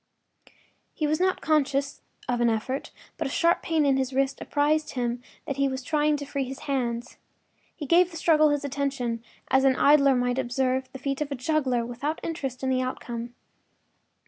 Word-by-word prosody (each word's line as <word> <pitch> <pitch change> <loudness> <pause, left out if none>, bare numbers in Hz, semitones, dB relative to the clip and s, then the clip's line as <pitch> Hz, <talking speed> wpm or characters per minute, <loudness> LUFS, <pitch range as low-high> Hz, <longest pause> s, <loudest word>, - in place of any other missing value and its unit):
” - - -31 0.3
He 310 - -1
was 305 +1 +1
not 370 0 +1
conscious 280 -2 +1 0.3
of 245 -1 0
an 235 - +4
effort, 230 +5 -2 0.3
but - - -1
a - - -4
sharp 335 +5 +2
pain 320 -2 +1
in 275 -1 +3
his 265 0 -1
wrist 270 +1 0
apprised 300 +1 +1
him 245 -1 -2 0.2
that 275 - -4
he 275 0 +2
was 265 0 -4
trying 300 +1 +1
to 285 - -6
free 280 -1 -2
his 265 +1 -7
hands. 245 -4 -2 0.6
He 300 - -6
gave 345 +5 +4
the 335 - -8
struggle 310 -1 +4
his 290 0 0
attention, 270 -4 -2 0.3
as 265 0 +4
an 265 -1 +4
idler 280 -1 +5
might 245 +1 0
observe 260 +1 -1
the - - -7
feat 275 +2 -3
of 300 -1 -2
a - - -1
juggler, 255 -3 0
without 265 +6 -3
interest 270 -6 -4
in 260 - +1
the 255 0 +2
outcome. 240 -2 -5
270 Hz, 195 wpm, -26 LUFS, 255-295 Hz, 0.6 s, idler